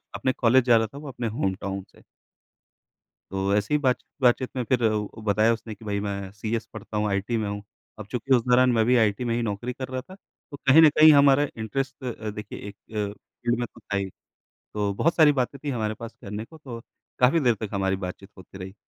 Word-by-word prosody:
अपने 130 - 0
कॉलेज 125 +1 +4
जा 120 -2 +6
रहा 110 -1 +1
था - - -9
वो 145 0 -8
अपने 125 -2 -4
होमटाउन 95 -4 -3
से। - - -20 1.3
तो 95 +1 0
ऐसी 105 +8 0
ही - - +5
बातचीत-बातचीत 130 -1 +1
में 125 - -1
फिर 125 -2 +2
अ, 110 0 -1
बताया 110 +2 +3
उसने 110 -1 -7
कि 110 - -15
भाई 100 -1 -1
मैं 100 -1 -4
सीएस 110 +2 -3
पढ़ता 110 0 -6
हूँ, 105 0 +1
आईटी 100 +4 -1
में 110 -2 -1
हूँ। 100 0 -5 0.4
अब 110 - -6
चूँकि 130 +2 +2
उस 120 - +2
दौरान 125 +1 +5
मैं 110 -2 +3
भी 125 +1 +4
आईटी 110 +1 +2
में 115 0 0
ही 120 - 0
नौकरी 115 +3 -3
कर 130 +1 -6
रहा 130 0 -4
था 185 +7 -14 0.4
तो 140 - -7
कहीं 150 +5 +8
न 155 - +8
कहीं 155 0 +10
हमारा 140 0 +5
इंटरेस्ट 130 +5 -4
अ, 110 -3 -4
देखिए 105 0 -7
एक 100 - -9 0.2
अ, 105 -2 -2
फ़ील्ड 120 +2 -4
में 120 - 0
तो - - -18
था 100 - -3
ही। 95 -1 -2 0.7
तो 100 -1 0
बहुत 165 +10 +1
सारी 155 -3 +7
बातें 135 +1 -2
थी 145 - -1
हमारे 110 -3 -2
पास 115 +1 -8
करने 105 +1 -5
को 160 +6 -15
तो 120 -6 -8 0.4
काफ़ी 130 +6 +4
देर 120 -4 +3
तक 110 - -4
हमारी 95 -1 +1
बातचीत 95 +1 -7
होती 95 +1 -13
रही। 95 +1 -8
115 Hz, 230 wpm, -25 LUFS, 105-130 Hz, 1.3 s, कहीं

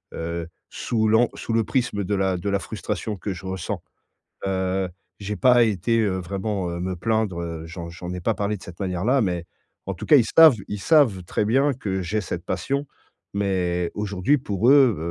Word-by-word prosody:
heu, 85 0 -4 0.2
sous 110 -3 -1
l'an 110 +2 +4
sous 115 - -4
le 115 - +3
prisme 120 -5 -1
de 100 +3 -1
la 95 -2 +1
de 100 +3 -3
la 100 - +2
frustration 105 +1 -4
que 100 +1 -4
je 95 +1 -10
ressens. 95 -2 -4 0.6
Heu, 95 0 0 0.3
j'ai 105 +1 -4
pas 125 -2 +5
été, 110 +2 +1
heu, 100 -4 0
vraiment, 95 0 -3
heu, 85 - -4
me 95 +1 -2
plaindre. 105 0 -1
Heu, 85 -1 -5
j'en 85 0 -7
j'en 90 +1 -7
ai 90 - -5
pas 110 +5 0
parlé 105 +1 -1
de 95 - -15
cette 90 -1 -11
manière 95 -1 -2
là, 130 +3 +3
mais 90 -5 -1 0.4
en 95 - -2
tout 85 - -8
cas, 155 - +6
ils 120 - +5
savent 160 -5 +9
ils 105 -1 -4
savent 125 - +3
très 105 - -1
bien 135 +6 +3
que 95 -6 -3
j'ai 100 +5 -1
cette 95 - -5
passion, 140 +1 -2 0.5
mais 90 -3 0
aujourd'hui, 105 +6 +1
pour 110 -2 0
eux, 135 -7 +6
100 Hz, 205 wpm, -24 LUFS, 90-115 Hz, 0.6 s, savent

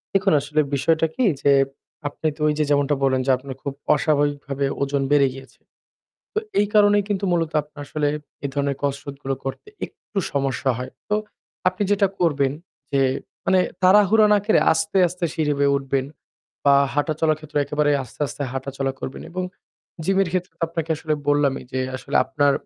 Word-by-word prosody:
দেখুন, 195 -2 +3
আসলে 150 +2 -1 0.2
বিষয়টা 160 +3 +2
কি 255 - +2 0.2
যে, 140 - +5 0.6
আপনি 155 - -3
তো - - -10
ওই 150 - +3
যে - - +4
যেমনটা 145 0 +3
বললেন, 130 -1 +3
যে - - +5
আপনার 135 0 -8
খুব 140 - -3 0.2
অস্বাভাবিকভাবে 145 -2 0 0.2
ওজন 140 0 0
বেড়ে 140 -2 +5
গিয়েছে। 135 0 -13 0.8
তো - - +2 0.2
এই 205 - +3
কারণেই 205 -1 +5
কিন্তু 200 -1 -1
মূলত 165 -2 0
আপনার 150 0 -14
আসলে 150 0 0 0.4
এই - - 0
ধরনের 140 -1 0
কসরত 140 0 -3
গুলো 135 0 -1
করতে 135 - -5 0.2
একটু 205 - -8
সমস্যা 135 -1 0
হয়। 130 +1 -5 0.2
তো 210 - +1 0.5
আপনি 185 +3 -3
যেটা 200 -1 +4
করবেন 140 -5 +2 0.4
যে 135 - +3 0.4
মানে 190 -1 +4 0.2
তাড়াহুড়া 210 +3 +6
না 205 - +5
করে 215 - +4
আস্তে, 160 +4 0
আস্তে 180 +1 -5
সিঁড়ি 150 -2 +1
বেয়ে 140 0 +3
উঠবেন 135 -1 -1 0.6
বা 140 -1 +6 0.2
হাঁটাচলার 155 +1 +1
ক্ষেত্রে 155 -1 -3
একেবারেই 150 0 +1
আস্তে, 130 +3 -14
আস্তে 140 - -6
হাঁটাচলা 135 0 -3
করবেন 130 - -6
এবং 185 +2 -3 0.6
জিমের 195 -1 +2
ক্ষেত্রে 185 -1 -1
তো 170 - -12
আপনাকে 165 -1 -4
আসলে 155 0 -3 0.2
বললামই 145 -2 +2
যে 130 - -1 0.2
আসলে - - -3
আপনার 140 +2 +2
145 Hz, 170 wpm, -23 LUFS, 140-170 Hz, 0.8 s, তাড়াহুড়া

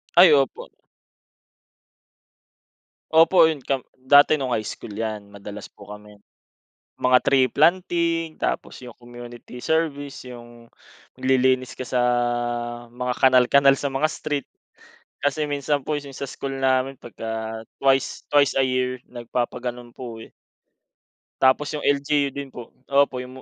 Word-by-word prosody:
Ay, 175 -2 +8
opo. 135 -2 +1 2.4
Opo, 165 +1 +6
'yon 145 -5 -4
camp 135 -2 -1 0.2
dati 145 +4 +5
no'ng 130 -3 -2
high 110 -1 -2
school 105 - -8
'yan, 105 -2 -5
madalas 100 0 -9
po - - -16
kami. 105 0 -12 0.8
Mga 125 0 +4
tree 130 -2 +4
planting 165 +2 +1
tapos - - -4
yung 120 -2 -11
community 120 0 -11
service, 145 -5 -2
yung 120 -1 -12 0.5
maglilinis 130 0 +1
ka 130 - -5
sa, 125 - 0 0.9
mga 125 0 -3
kanal 130 -1 +5
kanal 140 0 +5
sa 145 - -2
mga 135 +3 0
street. 145 -2 -4 0.8
Kasi 150 +1 0
minsan 145 0 -1
po 155 - 0
yung 140 -2 -9
sa 140 +1 -6
school 135 0 -5
namin 130 0 +1
pagka 110 -1 -6 0.2
twice, 135 0 +1
twice 145 -1 +4
a - - +5
year, 130 -1 -1
nagpapagano'n 120 0 -4
po 120 -3 -8
eh. - - -12 1.1
Tapos 135 +3 +3
yung 150 - -4
LGU 145 0 +1
din 140 -1 -8
po. 120 -2 -9 0.2
Opo, 140 -1 +2
yung 125 +1 -8
130 Hz, 135 wpm, -23 LUFS, 120-145 Hz, 2.4 s, Ay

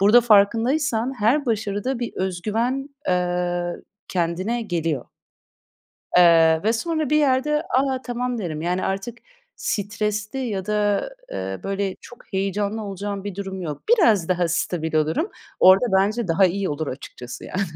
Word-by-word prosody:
Burada 210 +5 +7
farkındaysan 235 +4 +3
her 260 +7 +2
başarıda 220 +3 -1
bir 240 -1 -4
öz 185 -2 -2
güven, 245 +6 -1 0.2
eee, 180 -1 0 0.5
kendine 185 +7 -1
geliyor. 165 - -2 1.1
Eee, 165 -2 +6
ve 220 - +3
sonra 310 +4 -1
bir 300 - +4
yerde, 300 +1 +2 0.2
"A, 265 -1 0
tamam." 245 0 -3
derim. 160 -7 -4
Yani, 180 +2 -1
artık 210 +5 -3 0.4
stresli 210 +3 -2
ya 210 -8 -3
da, 210 - +1 0.2
eee, 95 0 -4
böyle 195 -1 -2
çok 245 - -15
heyecanlı 200 +3 -1
olacağım 200 0 -5
bir 205 - -5
durum 190 -1 -5
yok. 150 -4 -5
Biraz 225 - +4
daha 180 -2 +1
stabil 160 -1 -1
olurum. 160 - +1 0.3
Orada 190 +6 +7
bence 210 +2 0
daha 185 +4 +4
iyi 190 +2 -1
olur 150 +1 -3
açıkçası 125 -2 -8
yani. 185 - -3
200 Hz, 140 wpm, -23 LUFS, 180-240 Hz, 1.1 s, Burada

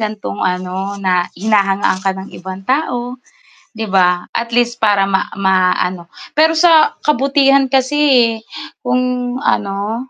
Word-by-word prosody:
gantong 210 -1 -5
ano 185 +2 -3
Na 185 -2 0
hinahangaan 195 -1 +1
ka 190 0 -2
ng 190 +1 -9
ibang 190 +1 -9
tao", 250 -2 -2 0.5
diba? 190 -5 0
At 235 0 -3
least 240 0 0
para 205 -3 +3
ma 195 -1 -1
maano. 185 -2 0 0.2
Pero 320 +1 +3
sa 320 -2 +4
kabutihan 275 -1 +3
kasi 265 +2 +1
eh, 240 -4 +4 0.5
kung 250 0 -1
ano 210 +3 -2
215 Hz, 125 wpm, -16 LUFS, 190-255 Hz, 0.5 s, sa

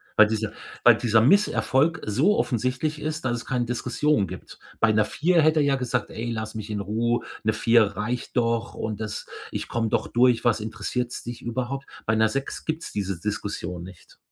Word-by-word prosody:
Weil 110 - +7
diese 110 0 -2 0.3
weil 120 -2 +8
dieser 115 -2 +3
Misserfolg 160 - +3
so 140 - +2
offensichtlich 130 +5 -1
ist, 155 -1 -3
dass 125 - +1
es - - -8
keine 125 -2 0
Diskussion 125 0 0
gibt. 90 +1 -10 0.2
Bei 115 - +4
'ner 110 0 +3
4 170 +6 +2
hätte 155 0 +4
er 145 - +3
ja 140 - +3
gesagt: 125 -1 -2
„Ey, 120 +1 -4
lass 110 0 -4
mich 110 -1 -6
in 105 -1 -2
Ruhe, 115 +4 0 0.2
'ne 110 0 +2
4 115 +1 +4
reicht 120 +4 -3
doch 115 0 +1
und 110 -1 -4
das 110 -1 -5 0.2
ich - - -4
komm 115 -1 -1
doch - - 0
durch. 120 -1 +3
Was 115 -2 +3
interessiert's 120 +3 -3
dich 120 0 -7
überhaupt?“ 130 +3 -3 0.2
Bei 110 - +2
'ner 110 0 +3
6 135 +3 -4
gibt's 160 +1 -3
diese 95 -3 -2
Diskussion 100 -3 -4
nicht. 90 -1 -14
120 Hz, 195 wpm, -25 LUFS, 110-130 Hz, 0.3 s, weil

